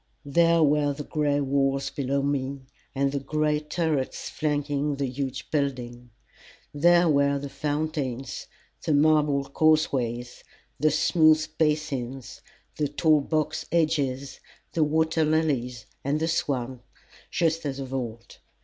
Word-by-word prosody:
There 165 +3 +4
were 145 -1 +2
the 145 +1 -6
gray 145 -1 0
walls 135 0 0
below 140 0 -1
me 140 -1 -2 0.3
and 135 0 +1
the 140 - -1
gray 150 +2 0
turrets 150 -3 -2
flanking 145 -1 -1
the 140 0 -2
huge 135 +1 -5
building; 125 -4 -2 0.6
there 175 +3 +4
were 140 -2 +3
the 140 0 -6
fountains, 145 -4 -3 0.4
the 155 - +1
marble 150 -1 +3
causeways, 135 -5 0 0.4
the 155 +3 +4
smooth 155 +1 +4
basins, 140 -5 -2 0.4
the 150 - +1
tall 150 +1 +3
box 155 +1 -2
hedges, 145 -5 0 0.3
the 160 - +2
water 160 +1 +1
lilies, 140 -7 0 0.2
and 145 +3 0
the 160 - 0
swans, 130 -6 -1 0.5
just 165 -1 0
as 140 -2 -3
of 135 -1 -6
old. 115 -3 -6
145 Hz, 125 wpm, -26 LUFS, 135-155 Hz, 0.6 s, There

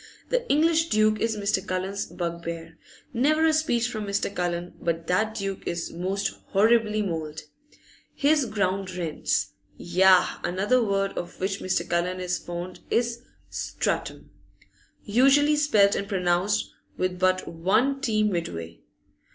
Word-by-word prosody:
The - - -1
English 325 +2 +3
duke 215 0 +3
is 225 -1 0
Mr. 200 0 0
Cullen's 190 +2 -3
bugbear; 170 -1 -5 0.3
never 305 +6 +3
a 320 - +4
speech 245 -7 +1
from 215 -3 -5
Mr. 200 0 -1
Cullen 175 0 -2
but 165 -1 -1
that 215 +6 0
duke 195 -2 -3
is 170 -1 -3
most 190 +4 -2
horribly 215 +1 +3
mauled. 160 -4 -4 0.7
His 285 -2 +3
ground 195 -3 -1
rents, 150 - -1 0.3
yah! 185 +1 +4
Another 205 +8 +2
word 195 -2 0
of 175 - -6
which 195 +1 -1
Mr. 180 -2 -1
Cullen 175 +2 -1
is 180 0 -2
fond 175 +1 -6
is 235 0 0 0.3
'strattum,' - - -3 0.7
usually 275 +7 +4
spelt 215 -9 +4
and 200 - -2
pronounced 175 - +1 0.3
with 185 -1 -1
but 185 0 +2
one 220 +12 +1
t 220 -5 +1
midway. 125 - -3
195 Hz, 135 wpm, -26 LUFS, 175-230 Hz, 0.7 s, a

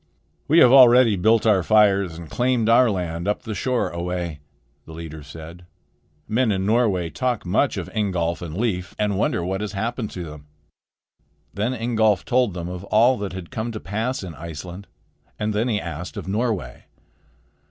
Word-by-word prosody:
"We 160 - +3
have 125 - +7
already 125 -4 +7
built 110 +4 +3
our 105 -4 +4
fires 100 -3 +3
and 85 -1 -9
claimed 125 +2 0
our 120 +1 +5
land 90 -3 -3
up 105 - -1
the 110 - -5
shore 125 +5 -1
a 85 - -5
way," 85 -3 -4 0.5
the 80 - -10
leader 80 -1 -8
said. 80 +4 -11 0.6
"Men 115 +1 +1
in 95 -1 -1
Norway 100 -7 +1
talk 125 -5 -2
much 105 +10 +1
of - - -4
Ingolf 90 -5 -1
and 85 -1 -6
Leif, 95 -6 -2
and 105 -1 0
wonder 85 - 0
what 95 +2 -2
has 105 -1 -4
happened 110 +2 -3
to 90 - -5
them." 75 -2 -10 1.1
Then 110 +6 -1
Ingolf 110 -4 +1
told 125 -6 +1
them 85 -1 -5
of 90 0 -6
all 115 +6 +4
that 100 -2 -4
had 95 -3 -8
come 115 +2 -3
to 110 - -5
pass 110 +6 -3
in 90 -3 -7
Iceland; 85 +5 -8 0.5
and 105 0 -2
then 110 +4 0
he 110 -4 0
asked 85 0 -7
of - - -6
Norway. 100 - -2
100 Hz, 180 wpm, -22 LUFS, 85-115 Hz, 1.1 s, have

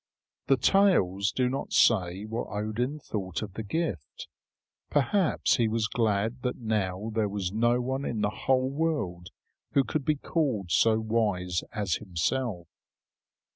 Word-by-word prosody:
The 135 - +4
tales 110 - +3
do 130 -1 +1
not 135 +2 -3
say 95 -3 +3
what 115 +2 -4
Odin 110 +7 -2
thought 100 - -4
of 100 -3 -7
the 110 - -5
gift. 110 - -4 0.6
Perhaps 160 +5 +2
he 115 -3 +2
was 110 0 0
glad 115 +1 0
that 125 0 -2
now 105 -2 -2
there 110 -2 +1
was 100 -2 -3
no 120 +3 +2
one 130 +2 -2
in 115 -6 -2
the 105 - +2
whole 130 +3 +1
world 140 - -2 0.4
who 140 - +4
could 150 +2 -2
be 155 +2 +2
called 130 - -1
so 110 -1 +4
wise 105 -6 0
as 100 -6 -1
himself. 95 +1 -2
110 Hz, 145 wpm, -28 LUFS, 100-130 Hz, 0.6 s, The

